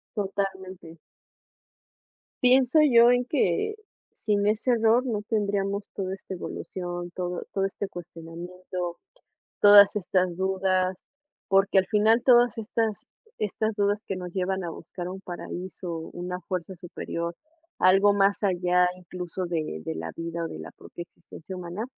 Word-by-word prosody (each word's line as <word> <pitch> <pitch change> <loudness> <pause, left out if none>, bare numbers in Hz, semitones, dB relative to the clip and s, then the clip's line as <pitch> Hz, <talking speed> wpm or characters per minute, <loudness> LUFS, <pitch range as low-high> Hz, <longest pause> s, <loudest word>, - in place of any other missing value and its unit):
Totalmente. 190 -4 -4 1.5
Pienso 255 +3 +5
yo 240 -5 +6
en 245 0 +2
que 260 - 0 0.4
sin 205 -2 0
ese 215 +4 +2
error 230 +2 +3
no 220 -5 -1
tendríamos 200 -2 -1
toda 190 -1 -3
esta 190 0 -8
evolución, 175 -1 -5
todo 180 0 -4
todo 195 -1 +1
este 195 +1 -4
cuestionamiento, 175 +1 -7 0.6
todas 205 -1 +8
estas 185 -2 0
dudas, 190 -1 0 0.4
porque 195 0 +4
al 190 - +3
final, 220 +3 +3
todas 240 -3 +5
estas 225 -1 -2 0.3
estas 215 +2 -1
dudas 205 0 0
que 195 - -3
nos 180 -1 -7
llevan 190 0 -1
a 170 - -3
buscar 175 +2 -7
un 190 +1 -7
paraíso, 180 -1 -6
una 180 +1 -5
fuerza 185 +1 -4
superior, 170 -1 -5 0.4
algo 195 +2 +5
más 200 +1 +2
allá, 180 -2 +3
incluso 180 0 -6
de 155 - -3
de 80 - -3
la 80 +1 -5
vida 170 0 -4
o - - -3
de - - -8
la - - -9
propia 175 - -10
existencia 170 +1 -11
humana, 180 +4 -5
190 Hz, 140 wpm, -26 LUFS, 175-205 Hz, 1.5 s, todas